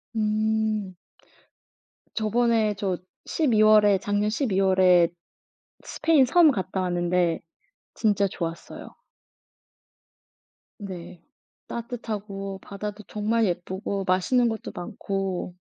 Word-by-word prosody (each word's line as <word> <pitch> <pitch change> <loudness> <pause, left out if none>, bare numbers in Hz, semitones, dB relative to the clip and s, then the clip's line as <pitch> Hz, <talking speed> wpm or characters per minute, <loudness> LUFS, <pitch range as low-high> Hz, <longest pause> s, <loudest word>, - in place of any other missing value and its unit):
음. 215 -2 0 1.2
저번에 225 -1 +2
저 195 -3 -1 0.3
12 250 -10 +2
월에 210 -2 +6
작년 205 +2 0
12 215 -4 0
월에 185 -3 +5 0.8
스페인 305 -3 +3
섬 335 +3 +6
갔다 190 -5 -2
왔는데 175 -1 0 0.5
진짜 205 -3 +2
좋았어요. 165 -2 -7 1.9
네. 180 -4 -8 0.5
따뜻하고 210 -5 -5
바다도 205 +1 -7
정말 220 +2 0
예쁘고 190 +2 -3
맛있는 195 +7 +2
것도 225 -2 -4
많고. 185 0 -4
205 Hz, 175 characters per minute, -25 LUFS, 185-220 Hz, 1.9 s, 월에